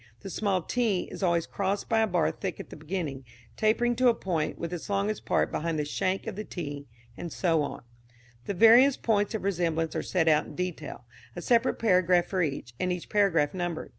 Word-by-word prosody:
The 195 Hz, -, -7 dB
small 195 Hz, -4 st, 0 dB
t 220 Hz, -5 st, 0 dB
is -, -, -8 dB
always 170 Hz, -3 st, +2 dB
crossed 200 Hz, +1 st, -2 dB
by 225 Hz, -1 st, +2 dB
a 220 Hz, -, +3 dB
bar 175 Hz, -4 st, +1 dB
thick 185 Hz, -5 st, -5 dB
at -, -, -9 dB
the -, -, -8 dB
beginning, 155 Hz, -4 st, -4 dB, 0.3 s
tapering 240 Hz, +3 st, +2 dB
to 255 Hz, 0 st, +4 dB
a 235 Hz, -, +5 dB
point, 165 Hz, -7 st, -2 dB
with 170 Hz, +1 st, -5 dB
its 175 Hz, -, -6 dB
longest 200 Hz, +1 st, -1 dB
part -, -, +1 dB
behind 165 Hz, 0 st, -2 dB
the 150 Hz, -, -1 dB
shank 185 Hz, +6 st, -1 dB
of 220 Hz, -3 st, -5 dB
the 210 Hz, -, -4 dB
t 145 Hz, -7 st, -6 dB, 0.3 s
[and 170 Hz, -, -6 dB
so 165 Hz, -4 st, +1 dB
on]. 145 Hz, -, -5 dB, 0.6 s
The 200 Hz, -, -3 dB
various 235 Hz, +7 st, +7 dB
points 205 Hz, -1 st, 0 dB
of 215 Hz, -, -4 dB
resemblance 165 Hz, -4 st, -1 dB
are -, -, 0 dB
set 170 Hz, -3 st, 0 dB
out 155 Hz, -1 st, +3 dB
in -, -, -11 dB
detail, 170 Hz, -8 st, -5 dB, 0.3 s
a 175 Hz, -, -5 dB
separate 240 Hz, +1 st, +3 dB
paragraph 180 Hz, -4 st, +3 dB
for 190 Hz, -2 st, -1 dB
each, 140 Hz, -6 st, -3 dB
and 185 Hz, 0 st, 0 dB
each 180 Hz, -1 st, -4 dB
paragraph 180 Hz, -8 st, +2 dB
numbered. 175 Hz, -3 st, -3 dB
180 Hz, 210 wpm, -28 LUFS, 165-205 Hz, 0.6 s, various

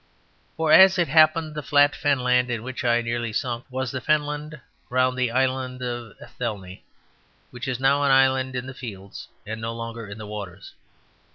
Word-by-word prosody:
For, 160 Hz, -1 st, +1 dB
as 190 Hz, 0 st, +8 dB
it 175 Hz, -2 st, +2 dB
happened, 155 Hz, +1 st, +4 dB
the 150 Hz, -, -4 dB
flat 145 Hz, 0 st, +3 dB
fenland 125 Hz, -3 st, +1 dB
in 115 Hz, -2 st, -3 dB
which 130 Hz, 0 st, -6 dB
I 120 Hz, -1 st, +2 dB
so -, -, -9 dB
nearly 120 Hz, -1 st, -2 dB
sunk 120 Hz, +1 st, -3 dB
was 130 Hz, -1 st, -3 dB
the 130 Hz, -, -4 dB
fenland 150 Hz, +2 st, -1 dB, 0.3 s
round 130 Hz, 0 st, +1 dB
the 125 Hz, -1 st, 0 dB
Island 130 Hz, 0 st, -1 dB
of 120 Hz, -3 st, -6 dB
Athelney, 100 Hz, -6 st, -7 dB, 0.7 s
which 120 Hz, +1 st, -7 dB
is 130 Hz, -2 st, -2 dB
now 135 Hz, +2 st, +3 dB
an 140 Hz, -, +2 dB
island 130 Hz, -1 st, +3 dB
in 125 Hz, 0 st, -3 dB
the 135 Hz, -, -8 dB
fields 100 Hz, -6 st, -9 dB, 0.2 s
and 110 Hz, +1 st, -6 dB
no 115 Hz, +1 st, -3 dB
longer 115 Hz, -1 st, -7 dB
in 100 Hz, +1 st, -9 dB
the 110 Hz, -, -8 dB
waters. 100 Hz, -3 st, -8 dB
125 Hz, 185 wpm, -24 LUFS, 115-140 Hz, 0.7 s, as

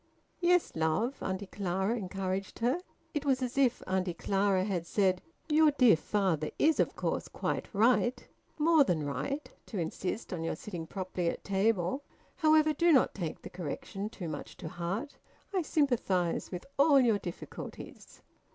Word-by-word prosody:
"Yes, 355 Hz, -1 st, +3 dB
love?" 160 Hz, -, 0 dB
Auntie 190 Hz, +1 st, -3 dB
Clara 190 Hz, +2 st, -1 dB
encouraged 195 Hz, -2 st, -3 dB
her. 245 Hz, +8 st, +1 dB, 0.3 s
It 295 Hz, -, -1 dB
was 270 Hz, -2 st, +1 dB
as 250 Hz, 0 st, -3 dB
if 265 Hz, -3 st, +2 dB
Auntie 185 Hz, -2 st, -1 dB
Clara 195 Hz, 0 st, +1 dB
had 180 Hz, -4 st, -2 dB
said: 190 Hz, -2 st, +2 dB, 0.3 s
"Your 310 Hz, 0 st, +5 dB
dear 255 Hz, -, +6 dB
father 165 Hz, -3 st, 0 dB
is 315 Hz, +1 st, +3 dB
of -, -, +2 dB
course -, -, -2 dB
quite -, -, -3 dB
right, 240 Hz, +3 st, +2 dB, 0.3 s
more 315 Hz, 0 st, +5 dB
than 165 Hz, -, 0 dB
right, 275 Hz, -, -3 dB, 0.2 s
to 215 Hz, -, -5 dB
insist 185 Hz, +5 st, -3 dB
on 165 Hz, -2 st, -3 dB
your 165 Hz, -, -1 dB
sitting 170 Hz, -2 st, -7 dB
properly 185 Hz, -2 st, -2 dB
at -, -, -5 dB
table. 200 Hz, +3 st, +1 dB, 0.4 s
However, 310 Hz, -2 st, +4 dB
do 340 Hz, +3 st, +3 dB
not 270 Hz, -5 st, +4 dB
take 170 Hz, -6 st, -5 dB
the -, -, -8 dB
correction 185 Hz, +4 st, -5 dB
too 185 Hz, -6 st, -7 dB
much 150 Hz, -2 st, -6 dB
to 160 Hz, -, -6 dB
heart. 190 Hz, -, -4 dB, 0.4 s
I 375 Hz, -, +2 dB
sympathise 235 Hz, -, +1 dB
with 180 Hz, -2 st, -5 dB
all 280 Hz, -1 st, +7 dB
your 230 Hz, -5 st, +3 dB
difficulties." 175 Hz, -3 st, -9 dB
200 Hz, 160 wpm, -31 LUFS, 180-270 Hz, 0.4 s, all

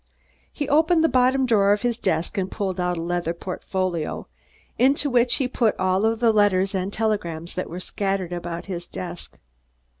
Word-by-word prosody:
He 290 Hz, -, -4 dB
opened 320 Hz, +3 st, +3 dB
the -, -, +5 dB
bottom 260 Hz, +1 st, +3 dB
drawer 205 Hz, -4 st, +4 dB
of 205 Hz, -, -2 dB
his 240 Hz, -1 st, 0 dB
desk 185 Hz, -2 st, -1 dB
and 190 Hz, -2 st, -1 dB
pulled 190 Hz, -4 st, -3 dB
out 180 Hz, 0 st, 0 dB
a -, -, -3 dB
leather 175 Hz, -1 st, -2 dB
portfolio, 180 Hz, -2 st, -3 dB, 0.5 s
into 275 Hz, +2 st, +3 dB
which 245 Hz, 0 st, +4 dB
he 265 Hz, -, 0 dB
put 235 Hz, -4 st, +1 dB
all 185 Hz, +1 st, +1 dB
the 225 Hz, 0 st, +2 dB
letters 195 Hz, -2 st, +3 dB
and 190 Hz, 0 st, -2 dB
telegrams 185 Hz, -7 st, -2 dB
that 185 Hz, -, -4 dB
were 175 Hz, -, -6 dB
scattered 195 Hz, -1 st, -2 dB
about 175 Hz, -1 st, -5 dB
his 175 Hz, -3 st, -6 dB
desk. 175 Hz, -1 st, -8 dB
195 Hz, 175 wpm, -23 LUFS, 180-235 Hz, 0.5 s, the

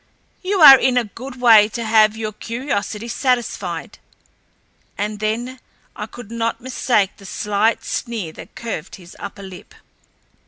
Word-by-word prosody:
"You 380 Hz, 0 st, -1 dB
are 270 Hz, -3 st, +11 dB
in 255 Hz, -1 st, +2 dB
a 245 Hz, -, +3 dB
good 250 Hz, +4 st, -10 dB
way 225 Hz, -4 st, +7 dB
to 230 Hz, +1 st, -5 dB
have 220 Hz, -1 st, +4 dB
your 215 Hz, -1 st, -4 dB
curiosity 230 Hz, -1 st, -4 dB
satisfied." 250 Hz, 0 st, -2 dB, 1.0 s
And 210 Hz, +1 st, -3 dB
then 235 Hz, +5 st, -3 dB, 0.4 s
I 210 Hz, -, -6 dB
could 230 Hz, -1 st, -12 dB
not 230 Hz, 0 st, -2 dB
mistake 240 Hz, -5 st, 0 dB
the 200 Hz, -, -15 dB
slight 210 Hz, +3 st, 0 dB
sneer 220 Hz, -9 st, -4 dB
that -, -, -13 dB
curved 225 Hz, -9 st, -6 dB
his 175 Hz, -2 st, -15 dB
upper 200 Hz, 0 st, -8 dB
lip. 190 Hz, -2 st, -12 dB
225 Hz, 145 wpm, -20 LUFS, 210-245 Hz, 1.0 s, are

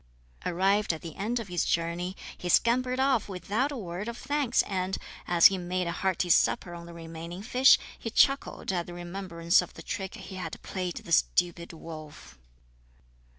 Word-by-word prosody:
Arrived 195 Hz, +2 st, +2 dB
at 160 Hz, -, -8 dB
the 165 Hz, -3 st, -7 dB
end 230 Hz, +5 st, -1 dB
of 225 Hz, -, -6 dB
his 175 Hz, -2 st, 0 dB
journey, 170 Hz, +3 st, -1 dB, 0.2 s
he 180 Hz, -, -5 dB
scampered 250 Hz, +6 st, +3 dB
off 265 Hz, -5 st, +2 dB
without 205 Hz, -, -1 dB
a 280 Hz, -, -4 dB
word 185 Hz, 0 st, -5 dB
of 235 Hz, 0 st, -5 dB
thanks, 275 Hz, -2 st, +1 dB
and, 190 Hz, -1 st, -2 dB, 0.3 s
as 175 Hz, -1 st, +4 dB
he 190 Hz, -1 st, +8 dB
made 180 Hz, +1 st, -2 dB
a 170 Hz, -, -1 dB
hearty 185 Hz, 0 st, 0 dB
supper 175 Hz, +1 st, +3 dB
on 170 Hz, 0 st, -9 dB
the -, -, -9 dB
remaining 165 Hz, +2 st, -8 dB
fish, 255 Hz, +4 st, +6 dB, 0.2 s
he 225 Hz, -, -4 dB
chuckled 275 Hz, -2 st, +2 dB
at 175 Hz, -2 st, -2 dB
the 175 Hz, -, -8 dB
remembrance 175 Hz, -1 st, +1 dB
of -, -, -9 dB
the -, -, -10 dB
trick 195 Hz, -2 st, -4 dB
he 190 Hz, -, -9 dB
had 185 Hz, -, -5 dB
played 180 Hz, -2 st, -3 dB
the 170 Hz, -, -9 dB
stupid 170 Hz, +1 st, +2 dB
wolf. 155 Hz, -, -10 dB
185 Hz, 180 wpm, -28 LUFS, 170-210 Hz, 0.3 s, he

